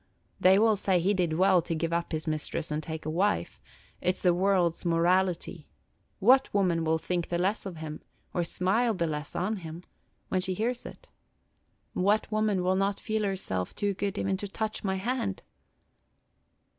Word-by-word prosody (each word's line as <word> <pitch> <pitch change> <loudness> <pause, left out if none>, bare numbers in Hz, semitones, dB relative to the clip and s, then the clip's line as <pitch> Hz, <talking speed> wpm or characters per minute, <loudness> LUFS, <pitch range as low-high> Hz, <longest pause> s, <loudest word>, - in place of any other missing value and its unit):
They 190 +1 +6
will 220 +1 +4
say 190 -2 +2
he 190 +4 +2
did 175 -4 0
well 185 +1 +4
to 165 0 -3
give 165 +1 -1
up 170 0 -1
his 155 -1 -2
mistress 155 0 -3
and 150 +1 -1
take 160 0 -6
a - - -2
wife; 200 +6 0 0.4
it 180 +1 +1
's - - -11
the 180 -2 +5
world's 180 -2 +2
morality. 175 -1 +1 0.5
What 255 +6 +5
woman 180 -5 +2
will 160 0 +2
think 175 +1 -2
the 175 - 0
less 195 +3 0
of 180 -4 -7
him, 155 -1 -6 0.3
or 175 - +1
smile 210 +7 +1
the 170 - 0
less 150 -2 -4
on 210 +4 -1
him, 165 -1 -8 0.5
when 185 - +1
she 185 0 0
hears 240 +5 -2
it? - - -13 0.8
What 205 +4 +1
woman 215 -3 +1
will 185 +1 +2
not 195 +1 0
feel 220 0 -1
herself 185 - -2
too 205 -1 0
good 200 +1 -3
even 195 0 0
to 205 - -5
touch 215 +2 -4
my 190 -2 0
hand?" 220 -1 -2
185 Hz, 180 wpm, -28 LUFS, 170-200 Hz, 0.8 s, They